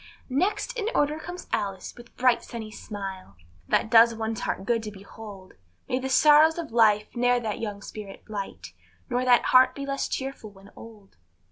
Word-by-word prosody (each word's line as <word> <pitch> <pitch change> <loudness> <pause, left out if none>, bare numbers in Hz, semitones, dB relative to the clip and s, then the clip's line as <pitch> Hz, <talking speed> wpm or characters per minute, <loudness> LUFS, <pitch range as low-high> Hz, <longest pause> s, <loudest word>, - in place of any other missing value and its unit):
Next 395 - 0
in 440 -3 -2
order 295 +2 +1
comes 355 +3 -8
Alice, 195 -3 -3
with 240 -1 -16
bright 250 -1 +3
sunny 220 -2 -8
smile, 195 - -8 0.3
That 220 - +1
does 230 0 +7
one's 225 0 -3
heart 190 - -3
good 230 0 +1
to 215 - -6
behold; 200 -1 -12 0.3
May 255 - -1
the 265 +1 -4
sorrows 305 +4 +6
of 330 -6 -5
life 215 -2 +3
ne'er 245 0 +2
that 220 -3 -4
young 205 -3 -5
spirit 205 -2 -9
blight, 205 -2 -7 0.4
Nor 250 +1 0
that 245 -1 +5
heart 255 0 +6
be 280 - -5
less 275 0 -2
cheerful 265 -5 -5
when 195 0 -17
old. 210 - -14
230 Hz, 175 wpm, -26 LUFS, 205-260 Hz, 0.4 s, does